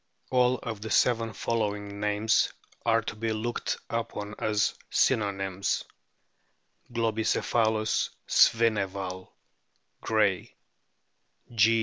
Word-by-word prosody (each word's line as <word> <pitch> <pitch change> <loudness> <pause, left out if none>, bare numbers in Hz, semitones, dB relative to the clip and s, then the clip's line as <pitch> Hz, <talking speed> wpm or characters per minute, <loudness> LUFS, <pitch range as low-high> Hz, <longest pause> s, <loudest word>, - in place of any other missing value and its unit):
All 125 0 +3
of 110 -3 -5
the 110 - -5
seven 115 -2 +2
following 105 -2 -2
names 105 +1 +2 0.4
are 115 -1 +3
to 110 - -5
be 110 +1 -2
looked 110 +2 -2
upon 115 -3 -4
as 105 -1 +1 0.2
synonyms: 100 -2 +1 1.1
Globicephalus 110 -1 +1 0.2
svineval, 100 -5 +2 0.7
Gray; 105 -5 +1 1.0
G. 115 +1 +4
110 Hz, 85 wpm, -28 LUFS, 105-115 Hz, 1.1 s, G